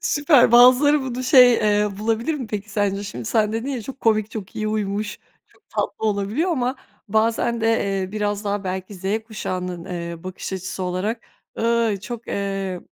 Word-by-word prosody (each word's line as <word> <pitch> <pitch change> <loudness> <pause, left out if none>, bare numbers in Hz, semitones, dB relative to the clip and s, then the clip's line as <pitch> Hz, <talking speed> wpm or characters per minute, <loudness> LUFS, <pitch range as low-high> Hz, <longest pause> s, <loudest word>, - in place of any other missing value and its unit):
Süper, 290 -5 +4
bazıları 255 +5 +7
bunu 255 -1 -4
şey, 250 -2 +7
eee, 210 -1 +2
bulabilir 230 +7 0
mi, 260 -6 -5
peki, 210 0 -5
sence? 200 -1 0
Şimdi 160 - -6
sen 215 - +1
dedin 230 +4 -3
ya, 255 -5 -3
çok 270 +4 -9
komik, 215 -1 +2
çok 205 -4 -8
iyi 215 0 -1
uymuş, 210 0 -2 0.3
çok - - -30
tatlı 220 - -2
olabiliyor 210 - 0
ama 255 -2 -1 0.3
bazen 225 +2 +1
de, 225 - +1 0.4
eee, 185 +2 -6
biraz 210 -1 -2
daha 200 -1 -2
belki 185 +2 -4
Z 190 +1 -13 0.2
kuşağının, 180 -5 -4
eee, 170 -1 -6
bakış 185 +1 -6
açısı 185 0 -4
olarak,“Iyy, 225 +3 -2
çok, 235 +2 -7
eee, 195 -2 -3
215 Hz, 165 wpm, -22 LUFS, 195-235 Hz, 0.4 s, bazıları